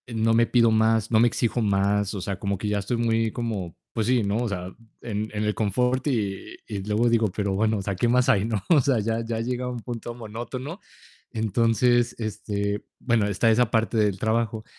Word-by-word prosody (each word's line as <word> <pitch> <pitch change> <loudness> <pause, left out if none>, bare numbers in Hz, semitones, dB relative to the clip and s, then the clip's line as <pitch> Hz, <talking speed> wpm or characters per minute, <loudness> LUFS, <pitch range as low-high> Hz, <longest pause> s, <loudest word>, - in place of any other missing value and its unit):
No 115 -1 +1
me 115 +1 +4
pido 115 -2 +4
más, 110 0 +2
no 110 - +5
me 120 - +6
exijo 120 +1 0
más, 100 0 +1
o 100 - -4
sea, 95 +1 -4
como 100 0 -2
que 105 - -4
ya 105 0 0
estoy 100 +5 -2
muy 115 -1 +1
como 105 -8 -4 0.2
pues 110 -3 -1
sí, 125 -2 +3
¿no?, 100 +1 0
o 120 0 -1
sea, 95 -3 -5 0.3
en 110 -1 -3
en 105 0 -2
el 105 0 +1
confort 125 +6 0
y 105 -8 -2
y 105 -3 -5
luego 105 +4 +1
digo: 115 -1 +3
"Pero 100 0 -2
bueno, 110 +2 +1
o - - -3
sea, 100 +1 -2
¿qué 110 +6 +1
más 125 +1 +3
hay, 100 -1 +3
no?", 110 -4 -2
o 165 -4 +6
sea, 135 -3 +2
ya 115 +2 -1
ya 115 0 -3
llega 125 +1 -2
un 125 -1 -4
punto 120 0 -6
monótono, 120 - -7 0.5
entonces, 115 +2 +2
este, 105 -2 -3
bueno, 115 -4 +1
está 105 +3 +2
esa 115 +1 +3
parte 115 0 +1
del 105 -3 +2
trabajo. 110 0 -1
110 Hz, 215 wpm, -25 LUFS, 105-120 Hz, 0.5 s, me